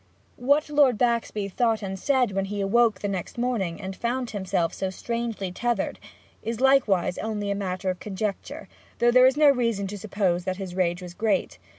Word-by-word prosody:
What 285 +5 +2
Lord 280 -6 +4
Baxby 235 -4 0
thought 225 +2 0
and 190 -1 -4
said 260 -2 +2
when 195 0 -1
he 205 +1 -4
awoke 220 +3 +2
the 205 - -1
next 190 +1 -4
morning, 230 -9 -1
and 190 -1 -6
found 245 +2 -2
himself 190 -4 -1
so 190 - -2
strangely 230 -1 -3
tethered, 235 +2 -2 0.4
is 230 0 -4
likewise 250 -10 +3
only 205 -2 -2
matter 190 -1 -2
of 180 - -7
conjecture; 200 0 -4 0.3
though 240 0 +4
there 255 +1 +7
is 265 +2 +1
no 300 -2 +7
reason 230 -6 0
to 200 +1 -6
suppose 190 -4 0
that 185 0 -2
his 190 -3 -6
rage 180 -1 0
was 175 -1 -8
great. 215 +3 -1
210 Hz, 185 wpm, -25 LUFS, 190-240 Hz, 0.4 s, there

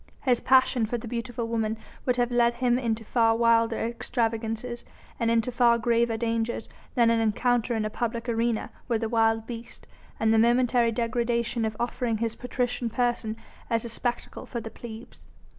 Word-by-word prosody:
His 250 -3 +2
passion 260 -3 +3
for 240 - -2
the 235 - -8
beautiful 235 0 -3
woman 225 -1 -1 0.3
would 250 - +3
have 245 0 +1
led 240 0 +3
him 245 0 +2
into 225 -2 -2
far 225 -1 +3
wilder 230 -1 +3
extravagances 230 0 -2 0.4
and 230 - +1
into 230 +1 +2
far 240 -1 +4
graver 235 0 +1
dangers 230 0 -1 0.3
than 235 -2 +4
an 230 - +2
encounter 235 +2 +1
in 220 -1 -1
a - - -1
public 235 +1 -3
arena 230 -1 0 0.2
with 230 -2 0
a 225 - -1
wild 225 -1 +2
beast, 235 0 -9 0.3
and 220 0 +3
the 225 - +5
momentary 240 0 +3
degradation 235 0 0
of 215 -1 -3
offering 240 -1 -1
his 230 +1 -2
patrician 245 -1 -2
person 235 -2 -1 0.3
as 230 -1 0
a - - -4
spectacle 240 +1 -4
for 240 - -4
the 225 -1 -7
plebs. 230 0 -11
235 Hz, 175 wpm, -27 LUFS, 225-240 Hz, 0.4 s, the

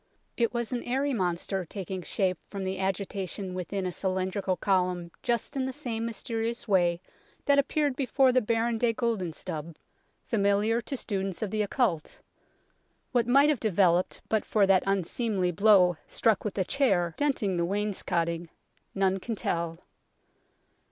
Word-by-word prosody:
It 235 -2 +1
was 235 0 -3
an 245 -1 -1
airy 270 +3 0
monster 185 -1 -1
taking 190 +1 -5
shape 185 0 -1
from 195 -2 -5
the 190 0 -3
agitation 190 0 -3
within 185 +1 -3
a 180 - -1
cylindrical 185 +1 -1
column 180 -3 0
just 235 0 -1
in 265 -1 0
the - - -2
same 235 -5 -3
mysterious 230 0 -3
way 175 -4 +3 0.5
that 280 0 +5
appeared 285 0 +1
before 265 -1 +3
the 255 0 +3
Baron 225 +1 0
de 235 -1 +2
Guldenstubbe, 180 - -3 0.5
familiar 210 +2 +2
to 270 +3 -4
students 195 -4 -3
of 205 - -3
the 215 - 0
occult. 205 - -1 0.9
What 240 -3 +2
might 275 +4 +5
have 295 -6 +1
developed 185 -4 +2
but 220 -2 +1
for 210 -2 +3
that 195 -1 +5
unseemly 195 0 0
blow 185 -2 +5
struck 225 -4 +1
with 210 - -3
the 190 - 0
chair, 190 - +2
dent 290 -5 0
ing 190 -3 0
the 170 - +1
wainscotting, 175 -4 -1 0.5
none 195 0 +2
can 225 +4 -4
tell. 170 -4 -2
200 Hz, 150 wpm, -28 LUFS, 185-235 Hz, 0.9 s, that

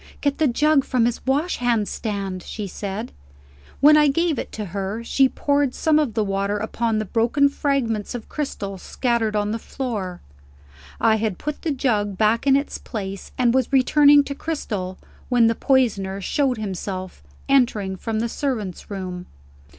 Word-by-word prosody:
"Get 285 0 -1
the 310 - +4
jug 290 +3 +3
from 250 -4 +1
his 240 -1 -1
washhand 245 - +1
stand," 195 -4 -4
she 210 +3 -6
said. 200 +4 -5 0.7
When 305 +2 +8
I 300 -1 +5
gave 320 0 +1
it - - -5
to 215 - -4
her, 200 +3 -3
she 265 +3 +3
poured 285 -2 0
some 310 -1 +3
of 265 -8 -1
the 220 - +2
water 200 +1 -1
upon 220 +1 -1
the 215 - -1
broken 240 +7 +2
fragments 255 -7 -1
of 230 - -7
crystal 200 -10 -4
scattered 235 -1 -1
on 210 0 0
the 225 - -2
floor. 210 -9 -4 0.8
I 220 -1 +4
had 215 -4 -2
put 300 -1 -5
the 330 - -2
jug 215 -8 0
back 220 +6 +2
in 270 - +6
its 280 +2 -1
place, 195 -4 -6
and 240 -2 +3
was 260 -1 +1
returning 285 +2 +6
to 280 - -5
Cristel, 210 - -4 0.3
when 245 -2 +4
the 230 - +4
poisoner 220 -8 +1
showed 260 +5 0
himself, 185 - -5 0.3
entering 225 -8 +2
from 220 +3 -3
the 235 - 0
servant's 225 - -3
room. 185 -3 -5
230 Hz, 165 wpm, -22 LUFS, 205-275 Hz, 0.8 s, When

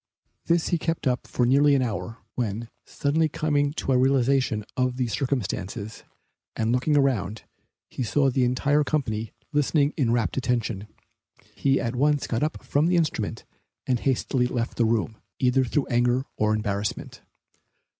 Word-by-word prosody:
This 170 -1 +2
he 175 - +1
kept 165 0 -2
up 125 -1 0
for 125 - +1
nearly 140 +3 +5
an 130 - +2
hour, 115 -1 -4 0.2
when, 115 -1 -3 0.2
suddenly 155 +3 +1
coming 145 -1 0
to 135 - -2
a 130 - +4
realization 130 -4 +2
of 125 -1 0
the 130 - +1
circumstances, 110 -4 -3 0.5
and 110 0 0
looking 125 +5 +2
around, 115 -7 0 0.4
he - - -6
saw 135 +5 +2
the 130 0 +1
entire 145 +4 +2
company 115 -8 -2 0.2
listening 145 0 +2
in 125 -7 +2
rapt 120 +1 0
attention. 115 -5 -1 0.7
He 135 -1 +1
at 115 +1 -2
once 145 +2 +2
got 115 - -2
up 155 +1 -2
from 145 +3 +1
the 180 - +2
instrument 115 -9 -1 0.4
and 125 -2 +1
hastily 130 -1 +1
left 120 -1 -3
the 115 - +3
room, 110 -1 0 0.2
either 130 +1 +3
through 135 +3 0
anger 120 +1 +1
or 110 0 +2
embarrassment. 105 -1 -3
125 Hz, 155 wpm, -25 LUFS, 115-140 Hz, 0.7 s, nearly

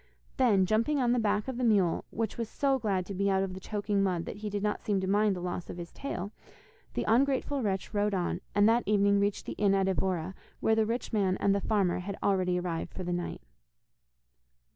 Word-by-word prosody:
Then, 210 -8 +4
jumping 230 +9 +1
on 245 -3 +2
the 245 - +2
back 210 0 0
of 260 -2 -4
the - - -1
mule, 200 -7 +2
which 220 -1 -3
was 230 -2 -4
so 275 -2 +1
glad 195 -5 0
to 200 - -6
be 200 +1 0
out 190 0 +2
of 190 -1 -4
the 185 - -7
choking 205 0 -1
mud 180 -3 0
that - - -6
he 210 0 -4
did 205 0 -3
not 210 0 -1
seem 205 -2 0
to 190 - -2
mind 205 +1 +2
the 180 - -6
loss 180 0 -4
of - - -6
his 170 -1 -7
tail, 200 -8 -5 0.6
the - - 0
ungrateful 270 +4 +2
wretch 195 -3 -2
rode 205 -1 +1
on, 175 0 -1
and 205 +1 +5
that 230 +2 +4
evening 200 -1 +3
reached 200 0 0
the - - -4
inn 200 -1 +4
at 195 -1 +2
Evora, 185 -2 -1 0.3
where 220 - +2
the 220 -1 +2
rich 235 +1 -3
man 195 -3 +2
and 200 - +2
the 200 - 0
farmer 195 -5 +1
had 195 +2 -5
already 185 -2 +2
arrived 170 -2 -3
for 185 - -4
the 175 0 -2
night. 175 0 -4
200 Hz, 230 wpm, -30 LUFS, 190-215 Hz, 0.6 s, and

